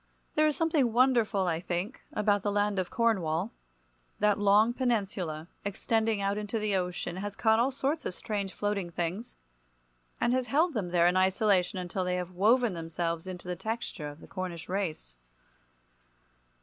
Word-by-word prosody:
There 310 0 +4
is 300 - +1
something 310 -7 +2
wonderful, 235 -6 +3
I 165 -2 0
think, 180 +7 -3
about 205 -1 +2
the 205 - -1
land 205 -1 +1
of 185 - -2
Cornwall. 195 -5 +1 0.7
That 210 -1 +2
long 205 +3 +5
peninsula 195 - -1 0.2
extending 220 +2 0
out 200 +1 0
into 210 +2 -3
the 210 -2 0
ocean 180 -1 -2
has 205 +1 -4
caught 220 -1 +3
all 245 +3 +3
sorts 275 +3 -1
of 180 - -5
strange 200 -3 -3
floating 205 -3 -2
things, 175 +7 -4 0.8
and 240 - +2
has 255 -1 0
held 320 +5 +2
them 200 -7 -2
there 170 -1 +3
in 180 +1 +4
isolation 190 0 +2
until 180 +1 -2
they 180 0 0
have 180 0 -3
woven 220 +5 +3
themselves 165 +1 -3
into 180 -1 -7
the 180 - -2
texture 220 -6 -4
of 145 +2 -10
the - - -12
Cornish 180 -3 -5
race. 165 - -3
200 Hz, 165 wpm, -29 LUFS, 180-225 Hz, 0.8 s, long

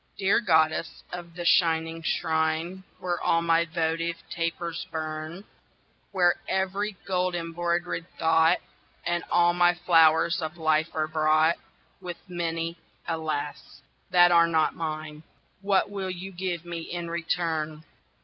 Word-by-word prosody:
DEAR 195 +2 +3
goddess 160 -5 +1
of 170 -1 -7
the 175 -1 -5
shining 165 -1 +3
shrine 160 +3 -1
Where 175 -2 -3
all 165 0 +2
my 165 0 +3
votive 165 0 -1 0.2
tapers 170 0 -3
burn, 155 +3 -5 0.7
Where 175 -2 +3
every 195 +2 -1
gold 180 -1 0
embroidered 170 0 -2
thought 160 0 +4 0.5
And 175 0 0
all 175 0 +4
my 175 0 +4
flowers 165 -1 +4
of 160 +1 -5
life 155 0 +2
are 155 -1 0
brought 155 +1 +3 0.4
With 175 -2 -6
many, 165 -1 -3 0.3
alas! 155 -3 -4 0.3
that 175 0 +6
are 170 -1 +6
not 160 -2 +2
mine 155 -2 -5 0.4
What 200 0 +2
will 195 -2 -3
you 185 +1 -6
give 175 -2 -4
me 170 -1 -5
in 170 +1 -5
return? 160 -2 -2
170 Hz, 130 wpm, -27 LUFS, 160-175 Hz, 0.7 s, that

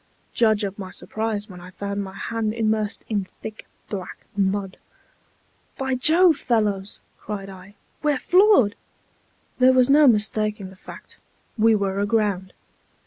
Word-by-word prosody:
Judge 220 -2 +3
of 200 0 -4
my 190 -2 -6
surprise, 215 +1 -4
when 180 -4 -11
I 180 - -11
found 200 +2 -4
my 190 0 -9
hand 220 +1 -3
immersed 220 -1 -1
in 205 -4 -2 0.2
thick 220 0 -8 0.2
black 190 -3 -7
mud. 195 -1 -1 1.0
"By 265 -1 -1
Jove, 320 +5 +4
fellows," 210 -6 -1 0.2
cried 195 -2 -6
I, 190 +2 -13 0.3
"we're 295 -2 +1
floored!" 360 - +4 0.8
There 255 +1 +6
was 255 +1 +4
no 295 +1 +7
mistaking 215 -3 +1
the - - -14
fact; 185 - -13 0.4
we 225 -1 +4
were 200 -1 -1
aground. 200 -3 0
210 Hz, 140 wpm, -23 LUFS, 195-230 Hz, 1.0 s, no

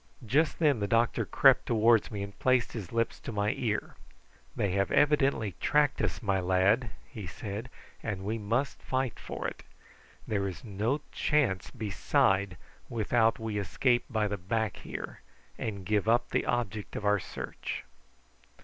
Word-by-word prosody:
Just 150 +8 +2
then 145 -7 +3
the 100 - -1
doctor 115 +2 +2
crept - - +5
towards 115 -1 +4
me 100 -2 -4
and 100 0 -9
placed 130 -2 +2
his 100 -7 -6
lips 115 0 0
to - - -6
my 105 -1 +1
ear: 105 -4 -2 0.6
"They 100 - 0
have 100 +1 +1
evidently 140 -8 +3
tracked 150 -1 +2
us, - - -2
my 100 -2 +1
lad," 95 +6 +2 0.2
he 105 -9 -8
said; 105 +7 -6 0.3
"and 95 -3 -4
we 110 +2 -1
must 115 +7 -1
fight 130 -2 -2
for - - -4
it. - - -7 0.7
There 100 -2 0
is 95 - -7
no 115 +6 -1
chance 140 -12 +1
beside 100 -4 +1 0.3
without 115 0 +2
we 110 -2 -3
escape 120 +6 +1
by 110 -4 +1
the 100 0 -3
back 110 +3 -1
here, - - -7 0.3
and 100 -4 -4
give 105 +1 +1
up 120 +1 +3
the - - 0
object 110 -4 -2
of 105 - -4
our 105 0 +4
search." - - -6
110 Hz, 160 wpm, -30 LUFS, 100-120 Hz, 0.7 s, crept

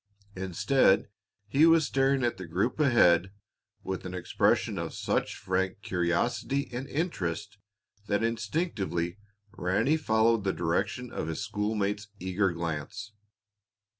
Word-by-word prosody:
Instead, 95 +4 +2 0.4
he 145 +8 +5
was 165 -2 +5
staring 135 -1 +2
at 120 -4 0
the 95 -2 -7
group 95 - -1
ahead 95 - +4 0.5
with 95 -1 -4
an 90 0 -6
expression 90 - +1
of - - -4
such - - -1
frank 95 +1 -1
curiosity 90 +10 0
and 130 +3 -4
interest 105 - -3 0.5
that 105 +2 +1
instinctively 105 - -2 0.4
Ranny 110 - +1
followed 110 -5 +2
the 95 -1 0
direction 100 +9 -1
of - - -4
his 80 +5 -3
schoolmate's 105 0 -1
eager 95 +1 0
glance. 85 +5 -4
105 Hz, 120 wpm, -29 LUFS, 90-120 Hz, 0.5 s, he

